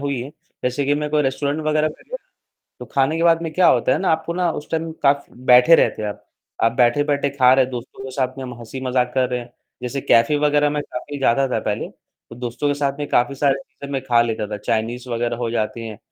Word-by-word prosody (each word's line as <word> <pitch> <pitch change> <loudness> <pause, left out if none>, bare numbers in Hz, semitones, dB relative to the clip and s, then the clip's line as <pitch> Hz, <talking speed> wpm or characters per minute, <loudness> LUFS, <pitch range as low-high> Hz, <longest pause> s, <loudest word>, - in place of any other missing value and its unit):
हुई 140 -3 -2
हैं, 130 +4 -7 0.3
जैसे 125 +3 0
कि 145 +1 +2
मैं 150 0 -2
कोई 150 0 +2
रेस्टोरेंट 140 +2 -1
वगैरह 155 0 +2
में 155 - -13
गया, - - -4 0.6
तो - - -7
खाने 140 +3 +2
के 165 - -1
बाद 165 -1 +4
में 165 -1 -4
क्या 180 +1 +4
होता 125 0 +3
है - - +1
ना 190 - 0
आपको 160 +1 0
ना 180 -1 +1
उस 150 - -8
टाइम 165 0 -2
काफ़ 140 0 +3 0.3
बैठे 125 +7 +8
रहते 110 - +2
हो 105 - -2
आप, 105 - -8 0.4
आप 115 - +4
बैठे-बैठे 140 +4 +2
खा 130 -2 +4
रहे 130 0 +4
हैं, 130 - -8
दोस्तों 125 +2 -7
के 135 - -6
साथ 130 0 -2
में 135 - -5
हम 125 -1 -7
हँसी-मज़ाक 125 +1 -2
कर 130 -1 +2
रहे 125 0 -1
हैं, 120 0 -12 0.3
जैसे 125 +3 -3
कैफ़े 115 +4 +3
वगैरह 150 0 +2
में 145 0 -2
काफ़ी 145 +2 -7
जाता 135 0 +2
था 120 -3 -1
पहले 105 -1 -3 0.4
तो 115 - -10
दोस्तों 125 +4 -3
के 145 - +1
साथ 140 -1 -2
में 145 - -3
काफ़ी 125 +3 +2
सारे 140 0 +2
चीज़ें 135 +1 -11
मैं 135 - -1
खा 120 -3 +3
लेता 110 -2 -2
था, 105 - -4
चाइनीज़ 115 +4 -2
वगैरह 120 0 -1
हो 120 -1 -3
जाती 115 0 -2
हैं 110 -2 -8
135 Hz, 250 wpm, -21 LUFS, 120-145 Hz, 0.6 s, बैठे